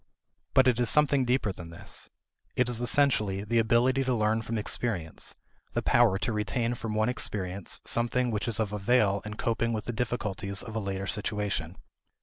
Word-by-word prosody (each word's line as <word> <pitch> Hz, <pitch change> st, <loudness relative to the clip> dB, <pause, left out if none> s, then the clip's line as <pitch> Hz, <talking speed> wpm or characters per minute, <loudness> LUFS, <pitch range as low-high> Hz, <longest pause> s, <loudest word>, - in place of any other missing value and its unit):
But 130 Hz, -, +6 dB
it 125 Hz, -2 st, +3 dB
is 120 Hz, -, +3 dB
something 145 Hz, -3 st, +4 dB
deeper 125 Hz, -4 st, +1 dB
than 85 Hz, -2 st, -9 dB
this. 85 Hz, -, -7 dB, 0.5 s
It 125 Hz, -, +2 dB
is 120 Hz, -1 st, -1 dB
essentially 120 Hz, -7 st, +2 dB
the 115 Hz, +2 st, +1 dB
ability 120 Hz, +4 st, +3 dB
to 130 Hz, -1 st, +1 dB
learn 110 Hz, 0 st, +1 dB
from 115 Hz, +1 st, -3 dB
experience; 105 Hz, -6 st, -2 dB, 0.4 s
the -, -, -1 dB
power 120 Hz, -5 st, +4 dB
to 110 Hz, +3 st, -1 dB
retain 115 Hz, +3 st, -1 dB
from 110 Hz, -2 st, -4 dB
one 110 Hz, +1 st, +2 dB
experience 100 Hz, -6 st, -2 dB
something 120 Hz, +1 st, +1 dB
which 105 Hz, +1 st, -2 dB
is 115 Hz, -2 st, 0 dB
of 105 Hz, -2 st, -1 dB
avail 105 Hz, -1 st, +2 dB
in 105 Hz, 0 st, -5 dB
coping 115 Hz, +1 st, 0 dB
with 110 Hz, -1 st, -3 dB
the 120 Hz, -, -3 dB
difficulties 105 Hz, -4 st, -2 dB
of 115 Hz, -2 st, -8 dB
a -, -, 0 dB
later 95 Hz, -1 st, -3 dB
situation. 100 Hz, -4 st, -2 dB
110 Hz, 180 wpm, -28 LUFS, 100-120 Hz, 0.5 s, But